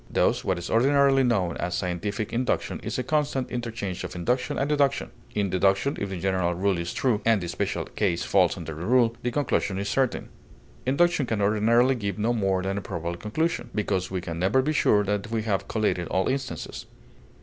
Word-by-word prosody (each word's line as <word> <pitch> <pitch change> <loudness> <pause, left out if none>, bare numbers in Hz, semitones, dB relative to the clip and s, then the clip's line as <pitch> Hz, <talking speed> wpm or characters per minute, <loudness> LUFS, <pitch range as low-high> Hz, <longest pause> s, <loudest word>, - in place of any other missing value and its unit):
Thus - - +1
what 95 - 0
is 85 - -5
ordinarily 135 +3 +4
known 100 -9 +1
as 90 0 -2
scientific 100 +4 -3
induction 125 +2 -1
is - - -4
a 130 - -1
constant 145 -2 0
interchange 115 -6 -4
of - - -6
induction 120 +9 -1
and 135 - 0
deduction. 145 -2 +1 0.2
In 100 -3 0
deduction, 95 +8 +2
if 100 - -3
the 95 -2 -4
general 95 -2 0
rule 95 0 +1
is 85 0 -3
true, 120 -6 0
and 115 -2 +4
the 85 - -5
special 95 +3 -2
case 90 -5 -1
falls 95 -2 +3
under 80 -2 -6
the 80 +3 -7
rule, 120 +2 +3
the 125 - -1
conclusion 120 -7 0
is 100 +1 -2
certain; 135 -3 0 0.6
induction 150 0 +2
can 110 -2 -1
ordinarily 110 +5 +3
give 100 -5 -3
no 110 +3 +1
more 95 -4 0
than 95 +1 -1
a - - -7
probable 85 -2 -4
conclusion, 155 - -2
because 95 -3 -1
we 95 -1 -3
can 85 -1 -5
never 100 +9 +3
be 155 +3 0
sure 105 -8 +3
that 105 +1 -2
we 115 -1 -1
have 100 -3 -1
collated 105 -6 0
all 95 0 0
instances. 130 -2 -4
105 Hz, 200 wpm, -26 LUFS, 95-125 Hz, 0.6 s, ordinarily